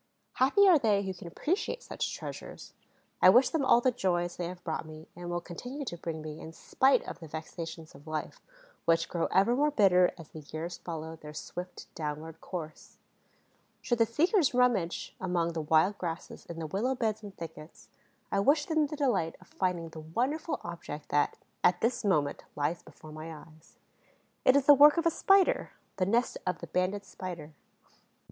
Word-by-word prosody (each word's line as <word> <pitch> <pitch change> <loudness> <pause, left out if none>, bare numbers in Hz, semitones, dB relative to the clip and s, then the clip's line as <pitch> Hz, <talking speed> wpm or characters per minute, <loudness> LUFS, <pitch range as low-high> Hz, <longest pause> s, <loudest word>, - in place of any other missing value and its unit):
Happy 280 +11 +4
are 350 -5 +7
they 210 -5 +2
who 190 -1 -3
can 175 -1 -10
appreciate 380 - -2
such - - -3
treasures! - - -8 0.5
I 185 - +9
wish 245 +6 +6
them 315 -3 0
all 240 -2 +5
the 255 - +3
joys 175 -6 -1
they 175 - -3
have 180 0 -9
brought 160 -2 -3
me 155 0 -11
and 175 0 -7
will 175 0 -1
continue 245 - -7
to 175 - -4
bring 165 -2 -5
me, 155 0 -7
in 160 - -9
spite 265 +10 +2
of - - -7
the 165 - -9
vexations 160 +1 -7
of 145 +3 -16
life, 155 -1 -4 0.4
which 165 0 +3
grow 170 -2 -1
ever 200 +6 +3
more 295 +3 +3
bitter 190 -9 +5
as 165 -3 -11
the 155 - -9
years 155 +4 -6
follow 160 -1 -6
their 150 -1 -11
swift 180 +4 -7
downward 155 +1 -5
course. 160 -4 -7 0.8
Should 240 -1 -1
the 230 - +5
seekers 315 - +2
rummage 235 -9 +1
among 175 -2 0
the 165 - -2
wild 160 +6 +3
grasses 170 -2 -6
in 170 - -7
the 165 - -4
willow 215 - -1
beds 220 -3 -1
and 205 -2 -10
thickets, 160 -1 -10 0.4
I 200 - +2
wish 290 +8 +3
them 315 -2 +2
the 300 - -5
delight 195 - +1
of - - -19
finding 180 -3 -1
the 160 - -10
wonderful 255 - -2
object 165 -3 -7
that, 145 0 +1 0.3
at 180 0 +4
this 235 +2 0
moment, 155 -8 +1
lies 150 +4 -1
before 155 0 -14
my 155 +1 -7
eyes. 155 0 -14 0.7
It 255 - +6
is 280 -1 +3
the 290 - +10
work 290 +3 +7
of 335 - +1
a 335 - +4
Spider, 390 +3 +3 0.2
the 185 - +1
nest 235 +4 +1
of 180 -2 0
the - - -8
Banded 190 +3 -1
Spider. 170 -5 -7
180 Hz, 190 wpm, -30 LUFS, 160-245 Hz, 0.8 s, the